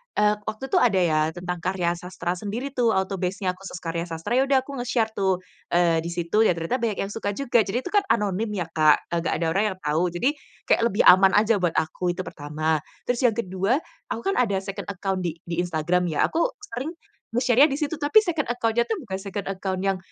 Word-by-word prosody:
eee, 210 Hz, 0 st, +4 dB
waktu 215 Hz, +3 st, -4 dB
itu 380 Hz, -, +4 dB
ada 205 Hz, -6 st, +3 dB
ya, 155 Hz, -3 st, +2 dB, 0.2 s
tentang 180 Hz, 0 st, -4 dB
karya 180 Hz, 0 st, 0 dB
sastra 180 Hz, -1 st, -4 dB
sendiri 230 Hz, +8 st, -4 dB
tuh, 240 Hz, -4 st, +2 dB
autobase-nya, 190 Hz, 0 st, -1 dB
khusus 190 Hz, +1 st, -10 dB
karya 170 Hz, +1 st, -3 dB
sastra. 165 Hz, +5 st, -6 dB
Yaudah 270 Hz, -1 st, +3 dB
aku 275 Hz, -1 st, -7 dB
nge-share 235 Hz, -2 st, 0 dB
tuh. 190 Hz, -3 st, 0 dB, 0.3 s
Eee, 170 Hz, -2 st, +4 dB
di 165 Hz, -, -4 dB
situ 170 Hz, +4 st, -1 dB
ya 180 Hz, -, +3 dB
ternyata 165 Hz, +10 st, -2 dB
banyak 225 Hz, -3 st, -1 dB
yang 195 Hz, -, -5 dB
suka 205 Hz, -2 st, -3 dB
juga, 250 Hz, -2 st, +2 dB
jadi 240 Hz, +6 st, -1 dB
itu 365 Hz, -, -6 dB
kan 410 Hz, -1 st, +3 dB
anonim 210 Hz, -, +1 dB
ya 180 Hz, -, -1 dB
Kak, 155 Hz, -2 st, +3 dB
e -, -, -5 dB
nggak 165 Hz, -, -1 dB
ada -, -, +1 dB
orang 195 Hz, +5 st, +2 dB
yang -, -, -24 dB
tahu. 155 Hz, +4 st, +1 dB
Jadi, 175 Hz, +9 st, 0 dB, 0.4 s
kayak -, -, +3 dB
lebih 205 Hz, -2 st, +1 dB
aman 190 Hz, +1 st, +7 dB
aja 215 Hz, 0 st, +4 dB
buat 175 Hz, -3 st, 0 dB
aku, 175 Hz, +3 st, -1 dB
itu 185 Hz, -, -4 dB
pertama. 155 Hz, -1 st, -2 dB, 0.2 s
Terus 245 Hz, -1 st, -1 dB
yang 225 Hz, -, 0 dB
kedua, 195 Hz, +1 st, 0 dB, 0.3 s
aku 230 Hz, -, -4 dB
kan 390 Hz, -, 0 dB
ada 215 Hz, -6 st, +2 dB
second 195 Hz, +1 st, -6 dB
account 195 Hz, -1 st, -2 dB
di 175 Hz, -3 st, -3 dB
di 170 Hz, 0 st, -2 dB
Instagram 175 Hz, +1 st, 0 dB
ya. 155 Hz, -3 st, +2 dB
Aku 335 Hz, +8 st, +2 dB, 0.2 s
sering 265 Hz, -, -5 dB, 0.4 s
nge-share-nya 250 Hz, +3 st, +5 dB
di 275 Hz, -, -2 dB
situ. 300 Hz, 0 st, -1 dB
Tapi 290 Hz, +9 st, +5 dB
second 335 Hz, -7 st, -1 dB
account-nya 235 Hz, -1 st, +1 dB
tuh 445 Hz, -, 0 dB
bukan 190 Hz, -5 st, -5 dB
second 195 Hz, 0 st, -5 dB
account 190 Hz, -1 st, -3 dB
yang 195 Hz, -1 st, +1 dB
195 Hz, 220 wpm, -24 LUFS, 175-235 Hz, 0.4 s, aman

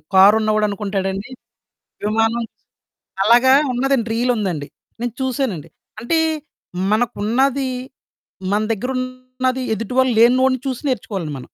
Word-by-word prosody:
కారున్నవాడు 215 Hz, +2 st, +5 dB
అనుకుంటాడండి, 195 Hz, +1 st, -3 dB, 0.8 s
విమానం 225 Hz, +2 st, +1 dB, 0.8 s
అలాగా 245 Hz, +4 st, +6 dB, 0.2 s
ఉన్నదండి 250 Hz, -2 st, 0 dB
రీలుందండి. 210 Hz, -, -1 dB, 0.3 s
నేను 240 Hz, -1 st, -3 dB
చూసానండి. 245 Hz, -, -2 dB, 0.3 s
అంటే, 285 Hz, +8 st, 0 dB, 0.7 s
మనకున్నది, 245 Hz, +4 st, +1 dB, 0.8 s
మన 210 Hz, -, +2 dB
దగ్గరున్నది, 255 Hz, +2 st, -3 dB
ఎదుటివాళ్ళు 250 Hz, +2 st, +1 dB
లేనోడిని 255 Hz, +1 st, +4 dB
చూసి 255 Hz, -2 st, -3 dB
నేర్చుకోవాలండి 190 Hz, -, -3 dB
మనం. 125 Hz, -, -11 dB
235 Hz, 90 wpm, -20 LUFS, 210-255 Hz, 0.8 s, అలాగా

